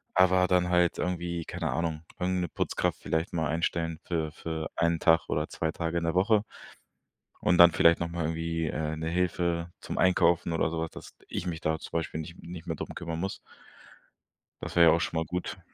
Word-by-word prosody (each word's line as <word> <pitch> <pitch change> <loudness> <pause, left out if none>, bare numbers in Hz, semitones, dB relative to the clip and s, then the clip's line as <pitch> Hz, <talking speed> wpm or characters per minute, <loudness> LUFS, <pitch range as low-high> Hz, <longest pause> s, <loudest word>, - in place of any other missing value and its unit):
Aber 95 0 +5
dann 90 -1 +3
halt 90 -1 +3
irgendwie 85 -2 -2
keine - - -3
Ahnung, 80 -2 -2 0.2
irgend 90 0 0
'ne 90 - -2
Putzkraft 85 -1 -1
vielleicht 80 +1 -1
mal 80 -2 0
einstellen 80 0 -1
für 80 -3 -1
für 80 0 -4
1 85 0 +1
Tag 80 0 +3
oder 75 +1 0
2 80 -1 -2
Tage 85 0 -2
in - - -5
der 85 +1 0
Woche. 105 +3 +4 1.0
Und 90 - +3
dann 85 0 +10
vielleicht 85 0 +5
nochmal 85 -1 -2
irgendwie, 80 +1 -2
äh, 75 +1 -2
'ne 80 +1 -3
Hilfe 85 -1 0
zum - - -5
Einkaufen 85 -2 +3
oder 80 - +1
sowas, 80 0 -2
dass - - -11
ich 90 - -4
mich 80 -2 -4
da 80 0 0
zum - - -10
Beispiel 80 -1 -2
nicht 85 +2 -9
nicht 85 -1 -9
mehr 80 - -2
drum - - -6
kümmern 85 -1 -4
muss. 95 +3 -3 1.2
Das - - -6
wäre 85 -1 +7
ja - - +8
auch - - 0
schon 85 - -2
mal 80 - -1
gut. 90 +3 -4
85 Hz, 200 wpm, -28 LUFS, 80-90 Hz, 1.2 s, dann